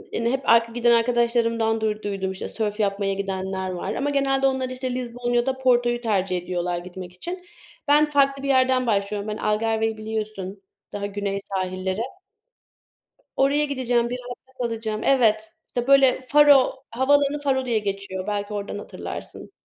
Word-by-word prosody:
hani 230 +1 0
hep 270 +1 -2
ar 230 0 +7
giden 235 +1 +1
arkadaşlarımdan 230 -1 +2
duyduydum 205 -3 -2
işte 190 - -6
sörf 210 -1 -2
yapmaya 200 -1 0
gidenler 190 -1 -3
var 185 +3 -4
ama 285 - -1
genelde 270 -1 +2
onlar 265 -1 -1
işte 255 0 -4
Lizbon 245 -1 -3
ya 240 0 +2
da 265 -1 -1
Porto'yu 240 -2 +2
tercih 195 -5 0
ediyorlar 175 0 -2
gitmek 180 0 -8
için. 355 - -7 0.4
Ben 295 +1 +5
farklı 275 -2 +2
bir - - -2
yerden 260 -1 +3
başlıyorum. 205 -1 -1
Ben 210 - -3
Algarve'yi 220 +1 0
biliyorsun 215 -3 -5 0.3
daha 200 0 -3
güney 200 0 -3
sahilleri. 185 +1 -3 1.3
Oraya 280 +2 +3
gideceğim, 245 -4 0
1 250 +1 -4
hafta 260 +1 -11
kalacağım. 225 -2 -3
Evet 220 -5 +3 0.2
işte 245 0 -3
böyle 270 -2 +5
Faro, 275 -1 +5
havaalanı 285 +4 +2
Faro 270 -2 0
diye 230 -3 +1
geçiyor. 195 -2 -4
Belki 205 0 -2
oradan 205 0 -4
hatırlarsın. - - -8
230 Hz, 155 wpm, -24 LUFS, 200-260 Hz, 1.3 s, ar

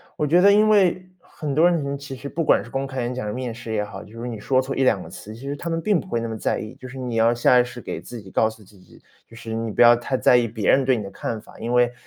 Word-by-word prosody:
我 150 - -1
觉 170 +5 +4
得 200 +2 +7
因 210 +1 +5
为， 185 -3 +3
很 150 -4 -6
多 160 +5 +5
人， 165 -5 0
嗯， 140 0 -2
其 140 -1 -8
实 140 - -8
不 165 +4 -2
管 - - +3
是 - - -14
公 135 0 -2
开 130 -2 -4
演 120 +1 -2
讲 125 -3 -4
还 105 - -3
是 105 - -4
面 125 -2 -4
试 115 -1 -8
也 105 -1 0
好， - - -9
就 115 +2 -13
是 120 - -5
你 115 -3 -5
说 130 +5 +1
错 135 +1 -2
一 135 - +1
两 110 -6 +3
个 - - -11
词， 110 +1 -10
其 115 - -13
实 140 +1 -4
他 170 +4 -6
们 165 0 -1
并 195 0 +1
不 - - -14
会 115 - -1
那 115 - -3
么 110 - -5
在 - - -1
意。 110 - -7
就 130 - -9
是 135 +1 -10
你 125 -2 -4
要 115 +1 +3
下 125 +1 +4
意 - - +5
识 125 0 -9
给 - - -6
自 120 - -9
己 95 -3 -13
告 110 +3 +2
诉 110 -1 -14
自 100 0 -20
己， 90 - -19 0.3
就 115 - -16
是 115 -1 -7
你 115 0 -2
不 - - -10
要 120 0 +8
太 125 +2 -2
在 125 - +5
意 120 -1 +1
别 110 -2 0
人 135 - +4
对 130 -2 +2
你 105 - -4
的 100 - -8
看 115 - -4
法， - - -16
因 115 +2 -4
为， 125 0 +3
125 Hz, 375 characters per minute, -23 LUFS, 115-140 Hz, 0.3 s, 要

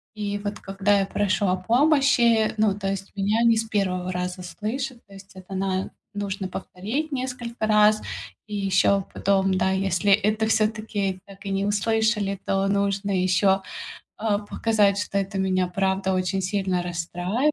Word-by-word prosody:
И 205 -1 -2
вот 205 0 -4
когда 195 +1 +1
я 195 - +1
прошу 205 0 0
о 185 - +2
помощи, 235 0 +3
ну, 215 -2 +3
то 195 -1 -3
есть 195 0 -4
меня 205 +3 +1
не 230 -1 +5
с 225 - +1
1 185 -4 -1
раза 180 0 -3
слышат, 240 +7 -4
то 200 - -16
есть 195 0 -13
это 185 +1 -10
на 190 0 -1 0.2
нужно 200 -1 -3
повторить 220 +12 -4
несколько 250 -4 -3
раз, 215 0 +5 0.5
и 210 - -5
ещё 195 0 +2
потом, 195 -1 +2
да, 185 +1 +2
если 195 +1 +1
это 210 +2 +3
всё-таки 215 -3 0
так 195 0 -14
и 195 - -3
не 195 +1 0
услышали, 210 -1 +1
то 195 0 +1
нужно 200 0 0
ещё, 190 +1 +3 0.6
а, 210 -1 0
показать, 205 -1 +1
что 200 - -2
это 195 0 -2
меня 185 -1 +1
правда 190 0 +1
очень 185 +1 0
сильно 190 -2 0
расстраивает. 180 - -1
200 Hz, 160 wpm, -24 LUFS, 190-215 Hz, 0.6 s, не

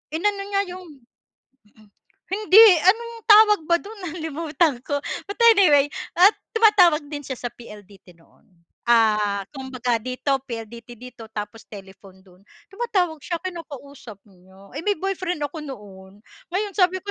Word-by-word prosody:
Inano 400 +4 -1
niya 400 0 -1
'yong 370 - -10 0.9
mhm. 215 -1 -23 0.4
Hindi, 420 +1 +6 0.2
anong 465 +4 +2
tawag 420 -2 +6
ba 340 - +2
do'n? 405 -2 -10
Nalimutan 320 -3 -1
ko, 285 -1 -2 0.2
but 405 - -6 0.2
anyway, 300 -10 +4 0.2
at 365 +4 +6 0.2
tumatawag 400 -8 +4
din 290 -2 -7
siya 265 - -4
sa 245 -1 -6
PLDT 205 -6 -15
noon. 165 0 -28 0.4
Ah 210 -4 +2
kumbaga 255 -4 -3
dito, 255 +4 -5 0.2
PLDT 235 0 -9
dito 240 -1 -12
tapos 215 0 -8
telephone 195 -1 -14
do'n. 185 -1 -22 0.3
Tumatawag 390 -7 -2
siya, 340 - -5
kinakausap 280 - -10
niya. 190 +1 -20
Eh - - -6
may 410 - +2
boyfriend 370 -3 -4
ako 290 +3 -5
noon. 205 -8 -11 0.3
Ngayon 410 +2 -1
sabi 370 0 +2
ko 405 - -6
285 Hz, 140 wpm, -22 LUFS, -, 0.9 s, Hindi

